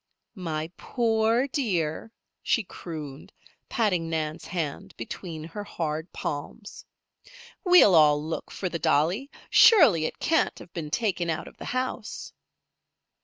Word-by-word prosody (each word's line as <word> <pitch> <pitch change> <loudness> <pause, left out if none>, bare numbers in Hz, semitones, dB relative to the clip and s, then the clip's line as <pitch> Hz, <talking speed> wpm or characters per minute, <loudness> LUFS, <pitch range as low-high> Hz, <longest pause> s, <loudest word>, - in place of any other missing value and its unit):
"My 160 -4 -4
poor 230 +1 +1
dear!" 195 - -2 0.3
she 230 - +1
crooned, 155 -6 -8 0.4
patting 185 -8 0
Nan's 155 -1 -3
hand 165 -7 -4
between 160 +7 -7
her 170 +6 -7
hard 160 -3 -4
palms. 150 +9 -6 0.8
"We'll 360 - +7
all 150 -3 +6
look 155 +2 -5
for 190 - -4
the 170 -2 -4
dolly. 175 - +1 0.2
Surely 255 - +7
it - - -4
can't 325 -1 +1
have 170 - -13
been 160 -3 -5
taken 180 -3 -1
out 160 - -2
of - - -14
the - - -8
house." 255 -3 -4
170 Hz, 125 wpm, -26 LUFS, 155-220 Hz, 0.8 s, We'll